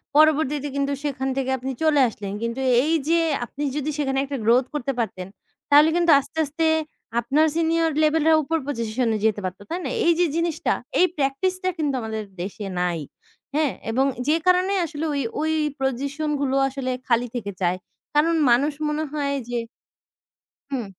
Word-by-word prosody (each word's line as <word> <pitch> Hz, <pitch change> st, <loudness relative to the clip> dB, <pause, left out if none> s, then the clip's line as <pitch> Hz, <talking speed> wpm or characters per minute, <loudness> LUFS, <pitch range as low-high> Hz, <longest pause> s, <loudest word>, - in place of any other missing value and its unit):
পরবর্তীতে 300 Hz, -2 st, +3 dB
কিন্তু 280 Hz, 0 st, 0 dB
সেখান 270 Hz, -2 st, -2 dB
থেকে 265 Hz, -1 st, -1 dB
আপনি 260 Hz, +1 st, -4 dB
চলে 300 Hz, -3 st, +4 dB
আসলেন। 205 Hz, -2 st, -7 dB
কিন্তু 235 Hz, +3 st, -2 dB, 0.2 s
এই 315 Hz, -, +1 dB, 0.2 s
যে 335 Hz, -, +4 dB, 0.3 s
আপনি 285 Hz, +5 st, -6 dB
যদি 300 Hz, 0 st, -2 dB
সেখানে 270 Hz, -2 st, 0 dB
একটা 275 Hz, 0 st, -4 dB
গ্রোথ 245 Hz, +3 st, +4 dB
করতে 275 Hz, -2 st, -1 dB
পারতেন, 185 Hz, -5 st, -3 dB, 0.4 s
তাহলে 295 Hz, +2 st, +7 dB
কিন্তু 345 Hz, -1 st, +4 dB
আস্তে, 280 Hz, +3 st, -10 dB
আস্তে 305 Hz, +3 st, -2 dB, 0.5 s
আপনার 275 Hz, +7 st, +2 dB
সিনিয়র 330 Hz, 0 st, +2 dB
লেভেল 310 Hz, 0 st, +3 dB
রা 320 Hz, -, +6 dB
উপর 325 Hz, +3 st, 0 dB
পজিশনে 230 Hz, -3 st, -1 dB
যেতে 215 Hz, -2 st, +2 dB
পারত। 185 Hz, +1 st, -5 dB
তাই 345 Hz, -, -2 dB
না? -, -, -2 dB, 0.2 s
এই 340 Hz, -, +6 dB
যে 355 Hz, -, +5 dB
জিনিসটা 335 Hz, -2 st, 0 dB, 0.3 s
এই 365 Hz, -, +7 dB
প্র্যাকটিস 275 Hz, +6 st, +1 dB
টা 370 Hz, -, +2 dB
কিন্তু 295 Hz, -4 st, 0 dB
আমাদের 220 Hz, -1 st, -4 dB, 0.2 s
দেশে 200 Hz, +3 st, -5 dB
নাই। 175 Hz, -2 st, 0 dB, 0.6 s
হ্যাঁ? 300 Hz, -3 st, +2 dB, 0.2 s
এবং 260 Hz, +4 st, +2 dB, 0.2 s
যে 305 Hz, -, +4 dB
কারণে 365 Hz, +2 st, +4 dB
আসলে 315 Hz, -1 st, -4 dB
ওই, 280 Hz, -, 0 dB, 0.2 s
ওই 315 Hz, +1 st, 0 dB, 0.3 s
পজিশন 280 Hz, +4 st, -1 dB
গুলো 270 Hz, -1 st, 0 dB
আসলে 265 Hz, -1 st, -3 dB, 0.2 s
খালি 245 Hz, -1 st, +2 dB
থেকে 205 Hz, -4 st, -3 dB
চায়। 180 Hz, +1 st, +1 dB, 0.4 s
কারণ 325 Hz, +3 st, +4 dB, 0.2 s
মানুষ 280 Hz, +5 st, +3 dB
মনে 300 Hz, +1 st, -1 dB
হয় 280 Hz, -2 st, -1 dB
যে 245 Hz, -, -1 dB, 1.1 s
হুম। 250 Hz, -5 st, -2 dB
280 Hz, 170 wpm, -23 LUFS, 245-310 Hz, 1.1 s, তাহলে